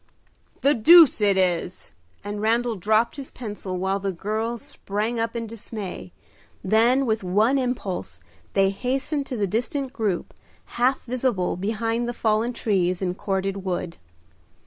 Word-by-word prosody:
"The 280 - +4
deuce 315 +1 +7
it 200 -2 +3
is!" 180 -1 -1 0.3
and 205 0 -5
Randal 230 +2 +1
dropped 215 +6 +1
his 275 -2 -7
pencil, 205 -6 -6
while 190 +2 0
the 195 0 -2
girls 220 +5 -3
sprang 215 +4 -3
up 230 +1 -2
in 230 0 -3
dismay. 210 - -7 0.5
Then, 235 +7 +3
with 220 -3 0
one 215 +9 +2
impulse, 200 - -3 0.3
they 195 0 +3
hastened 270 +7 -2
to 255 - -4
the 205 - +1
distant 250 +7 -2
group, 210 -8 -2 0.4
half 255 +3 +1
visible 240 -7 -1
behind 225 +4 -1
the - - -3
fallen 220 +2 +1
trees 185 -6 0
and 180 -1 -1
corded 195 0 -2
wood. 180 -2 -3
220 Hz, 145 wpm, -24 LUFS, 195-240 Hz, 0.5 s, deuce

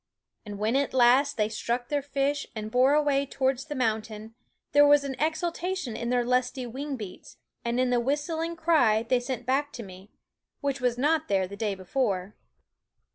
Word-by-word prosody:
And 205 -1 -6
when 215 +4 0
at 275 -1 0
last 260 +3 +4
they 210 -1 +2
struck 235 +3 -3
their 290 -1 0
fish 280 0 -1
and 215 0 -5
bore 260 +4 +4
away 285 -2 +2
towards 265 0 -1
the 295 -1 -6
mountain, 220 -2 -2 0.4
there 290 0 +6
was 290 0 +5
an 275 -1 -4
exultation 335 -2 -2
in 235 +1 -3
their 245 -1 +2
lusty 250 +1 0
wing 275 +4 -5
beats, 210 -7 -10 0.3
and 235 +1 -1
in 255 -1 +2
the 245 - +3
whistling 315 +6 -1
cry 305 -10 +3
they 245 +2 +1
sent 245 -1 -5
back 280 +3 0
to 235 - -6
me, 190 0 -12 0.5
which 275 -2 -2
was 245 -1 +1
not 300 +4 +1
there 190 -2 +1
the 200 - -8
day 210 -1 -2
before. 195 -1 -2
255 Hz, 185 wpm, -27 LUFS, 225-285 Hz, 0.5 s, there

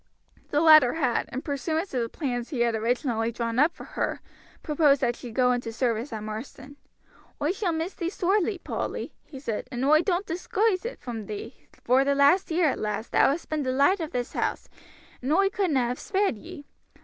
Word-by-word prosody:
The 295 - +2
latter 310 -6 +7
had, 265 -7 0
in 260 - -4
pursuance 315 +5 -2
of 250 - 0
the 230 - -2
plans 245 -5 -3
he 265 -7 -2
had 235 -1 +2
originally 230 0 0
drawn 230 0 -2
up 300 +4 +5
for - - -10
her, - - -3 0.4
proposed 295 -2 +3
that 240 -2 +1
she 245 - -9
should 225 - -10
go 250 -1 +4
into 245 -2 -2
service 235 +2 -1
at 215 -2 -5
Marsden. 260 +6 -8 0.6
"Oi 295 +3 +1
shall 390 -2 -1
miss 325 +3 -3
thee 340 -1 -3
sorely, 390 +1 +1
Polly," - - -4
he 270 - -9
said; 230 -6 -4
"and 250 +1 -2
oi 310 +2 +5
doan't 365 +1 0
disguise 375 +4 0
it 480 - -5
from 225 -5 -6
thee, 215 +4 -8 0.2
vor 255 +3 +4
the 280 0 +1
last 285 +7 +4
year, 320 -3 +2
lass, 215 +2 -3
thou - - +4
hast 295 +5 -3
been 310 -1 -1
the 260 -2 -1
light 285 +9 +3
o' 320 - -2
this 245 -6 -4
house, - - -2 0.5
and 260 +3 -2
oi 390 +3 +4
couldna 350 -10 +1
have 245 +1 -2
spared 395 - 0
ye. 315 - -11
280 Hz, 205 wpm, -26 LUFS, 240-335 Hz, 0.6 s, latter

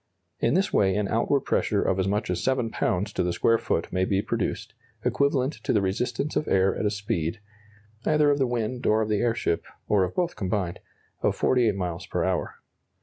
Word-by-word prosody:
In 115 - +2
this 190 +2 +1
way 95 -1 +3
an 105 -1 0
outward 120 +5 +2
pressure - - +1
of 95 - 0
as 95 - +1
much 105 +3 -1
as - - -2
7 130 -4 0
lbs. 100 +1 -1
to - - 0
the 90 0 0
square 115 +6 +2
foot 85 - -2
may 95 - +1
be 95 +1 +1
produced, - - -3 0.3
equivalent 140 0 +1
to - - 0
the 105 - +3
resistance 100 +9 -1
of 150 - 0
air 95 0 +3
at 105 - 0
a - - +3
speed 100 -2 -2 0.6
(either 150 0 +3
of 145 - +1
the 135 - +2
wind, 120 +1 -2
or 110 +1 +3
of 110 - -4
the 105 -1 +1
airship, 115 -7 0 0.2
or 100 -2 +3
of 90 - -3
both 175 -1 0
combined) 95 -2 -2 0.4
of - - +1
48 120 -5 +2
miles 90 -3 -4
per - - -1
hour. - - -1
105 Hz, 205 wpm, -26 LUFS, 95-125 Hz, 0.6 s, way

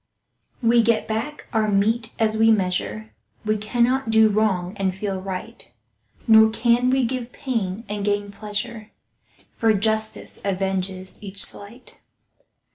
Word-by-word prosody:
We 235 +1 +5
get 230 -1 +1
back 225 +7 -4
our 220 -1 +2
mete 220 +3 +1
as 220 -1 +1
we 225 +1 +4
measure— 215 +2 -1 0.3
We 215 0 +2
cannot 235 +4 0
do 220 -1 +5
wrong 200 -4 0
and 190 -2 -1
feel 190 -1 -3
right, 185 -8 -7 0.6
Nor 220 -1 +7
can 235 +2 +2
we 260 -1 +2
give 250 0 -4
pain 225 -7 -3
and 205 0 -4
gain 205 0 -1
pleasure, 215 +2 -5 0.6
For 225 -1 +2
justice 220 +1 -2
avenges 190 -1 -3
each 200 -1 -3
slight. 220 +5 -8
215 Hz, 130 wpm, -23 LUFS, 200-230 Hz, 0.6 s, Nor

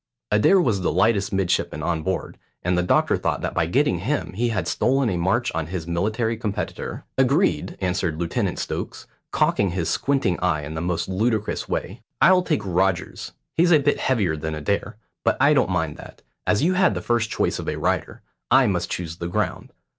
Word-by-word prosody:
Adair 105 - +5
was 115 - +1
the 90 - +1
lightest 100 +4 +2
midshipman 90 -5 0
on 80 -1 -1
board, 95 +2 -3 0.2
and 90 +1 +1
the 90 - +2
doctor 90 - +2
thought - - -1
that - - -3
by 80 - +1
getting 110 - +2
him 125 - -2
he 120 +5 0
had 115 - -2
stolen 130 -3 +1
a - - -1
march 95 +8 +1
on 80 -2 -2
his 85 -2 -4
military 110 +7 -1
competitor. 105 -3 -4 0.2
"Agreed," - - +2
answered 90 -3 -1
Lieutenant 85 0 -1
Stokes, - - -5 0.2
cocking 100 - +2
his 85 -2 -2
squinting 135 -11 0
eye 80 -5 0
in 75 +2 -6
the 80 - -4
most 85 -1 -1
ludicrous 105 +3 -1
way. - - -3 0.2
"I'll 185 0 +6
take 155 - -1
Rogers. 95 0 -1 0.2
He's 170 +2 +3
a 160 - +8
bit 145 0 +1
heavier 100 -11 +1
than 80 0 -4
Adair, 100 +7 -2 0.3
but - - +2
I 140 +3 +5
don't 140 - +2
mind 80 -4 -1
that. - - -13 0.2
As 105 +6 +2
you 180 +3 +3
had 185 0 +3
the - - -3
first 115 -2 0
choice - - -1
of - - -3
a - - -2
rider, - - -2 0.3
I 130 +1 +6
must 90 -5 0
choose 85 -2 -4
the 85 - -4
ground. 85 - -2
95 Hz, 195 wpm, -23 LUFS, 85-120 Hz, 0.3 s, a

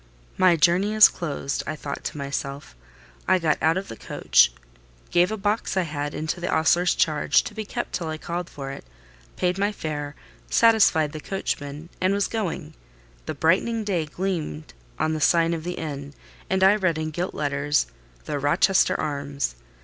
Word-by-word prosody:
"My 185 -2 +5
journey 180 +6 +3
is 215 - +10
closed," 145 -4 -3
I 155 - -2
thought 145 -2 -6
to - - -4
myself. 140 - -5 0.5
I 185 - +5
got 160 -4 +1
out 160 +2 +3
of 195 - -4
the - - -7
coach, - - +3 0.6
gave 175 +3 +3
a 220 - -2
box 205 0 -1
I 185 - +3
had 145 -2 -4
into 160 +3 -3
the 175 - -2
ostler's 170 +2 +3
charge, 155 -4 +2
to - - -7
be 215 0 -5
kept - - -4
till 170 - -2
I 155 0 -3
called 170 +2 -4
for 135 -1 -7
it; 135 - -8 0.5
paid 180 +1 0
my 200 +1 +2
fare; 150 -6 -5 0.3
satisfied 200 - +4
the 155 - -6
coachman, 150 -3 -4
and 185 +2 +2
was 200 - +1
going: 195 - -4 0.5
the - - -3
brightening 215 +7 +2
day 180 -7 -1
gleamed 150 - -4 0.2
on 160 - 0
the 155 - -3
sign 165 +3 +3
of 165 -1 -4
the 180 +1 -3
inn, 145 -4 -6 0.3
and 190 0 +1
I 195 +2 +6
read 185 -6 +1
in 155 0 -3
gilt 175 +4 -3
letters, 145 0 0 0.4
"The 145 - -2
Rochester 170 +6 +3
Arms." 140 - -2
160 Hz, 180 wpm, -24 LUFS, 145-185 Hz, 0.6 s, is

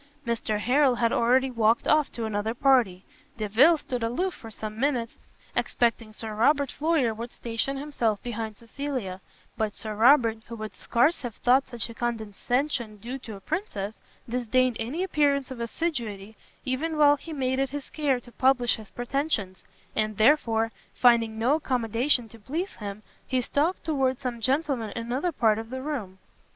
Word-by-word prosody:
Mr 230 -2 -1
Harrel 255 +4 +3
had 230 -1 +1
already 255 +3 +3
walked 230 -1 +2
off 305 -1 +3
to 230 - -3
another 220 +1 -2
party: 240 -9 +3 0.3
Delvile 230 +10 +5
stood 250 -4 -4
aloof 300 +12 -1
for 225 - -11
some 215 0 -6
minutes, 250 -4 -1 0.4
expecting 230 -2 0
Sir 220 0 -6
Robert 275 +5 +3
Floyer 300 -7 +1
would 230 +2 -6
station 235 +4 -2
himself 245 -7 -1
behind 225 -3 -4
Cecilia; 230 -6 -5 0.4
but 215 -2 -1
Sir 215 -1 -4
Robert, 230 0 +5
who 235 - -7
would 215 -1 -7
scarce 275 +9 +2
have 240 -4 -5
thought 260 +2 +3
such 240 -2 -3
a 230 - -9
condescension 235 +1 -2
due 240 +6 -6
to 225 -4 -8
a - - -10
princess, 215 - -4 0.3
disdained 250 +1 +1
any 270 +11 -2
appearance 285 -6 +1
of 255 - -6
assiduity, 230 -6 -3 0.3
even 300 +5 -1
while 290 -1 +6
he 325 - -10
made 260 -3 -1
it 270 0 +1
his 285 +1 -6
care 285 -5 +1
to 240 - -15
publish 250 0 +3
his 220 -2 -11
pretensions: 245 - -2 0.3
and 215 -1 0
therefore, 225 -2 +3 0.2
finding 230 -3 +4
no 240 +5 +3
accommodation 245 -2 +1
to 230 +1 -14
please 320 - -4
him, 205 0 -6 0.2
he 260 - +1
stalked 295 +8 0
towards 270 -5 0
some 240 -2 -4
gentlemen 265 -2 0
in 230 - -3
another 265 +9 -1
part 220 -7 +2
of 225 0 -7
the 260 +1 -5
room. 230 -11 -4
240 Hz, 165 wpm, -27 LUFS, 220-275 Hz, 0.4 s, while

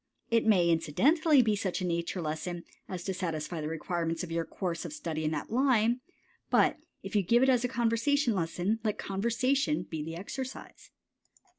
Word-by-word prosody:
It 230 -1 +3
may 185 -6 +5
incidentally 260 - +4
be 215 -2 +2
such 195 -3 -2
a 185 - -2
nature 170 +1 -2
lesson 165 +3 -4 0.3
as 180 -2 -5
to 190 - -2
satisfy 165 -3 -3
the 150 - -3
requirements 165 +1 -2
of 170 - -6
your 165 0 -1
course 170 -2 -3
of 165 -4 -6
study 155 +1 -4
in 155 - +1
that 155 +3 -4
line, 245 -1 +3 0.5
but - - +4 0.3
if - - -6
you 205 - +5
give 235 +7 +3
it 265 - +4
as 250 -2 +3
a - - +2
conversation 240 +2 +1
lesson, 180 +4 -1
let 215 -2 0
conversation 255 +9 0
be 160 -2 -5
the 165 +2 -5
exercise. 260 +9 -7
190 Hz, 180 wpm, -30 LUFS, 165-235 Hz, 0.5 s, may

